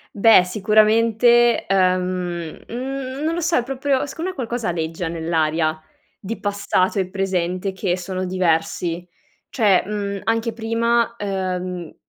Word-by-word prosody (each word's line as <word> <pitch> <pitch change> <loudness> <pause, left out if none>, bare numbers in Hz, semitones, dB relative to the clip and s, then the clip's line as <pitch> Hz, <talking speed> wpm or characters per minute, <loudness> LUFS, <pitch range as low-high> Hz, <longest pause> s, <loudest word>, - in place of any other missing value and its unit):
Beh, 205 -2 +6
sicuramente, 225 +4 +3
uhm, 195 - +3 0.9
n 260 +2 -5
non 320 +1 0
lo 340 - -2
so, 340 0 +1
è 245 - +2
proprio 270 +2 -1
secondo 330 +5 -4
me - - -15
qualcosa 240 -3 -3
aleggia 165 0 -3
nell'aria 160 -1 0 0.4
di 220 +4 -5
passato 200 -1 0
e 185 -1 -1
presente 185 -1 -1
che 190 -1 -1
sono 185 +1 -4
diversi. 175 -1 -1 0.4
Cioè, 205 -6 +3
mhmm, 200 -1 -3
anche 230 +1 0
prima: 230 +1 0
uhm, 185 -4 -4
200 Hz, 130 wpm, -21 LUFS, 180-235 Hz, 0.9 s, Beh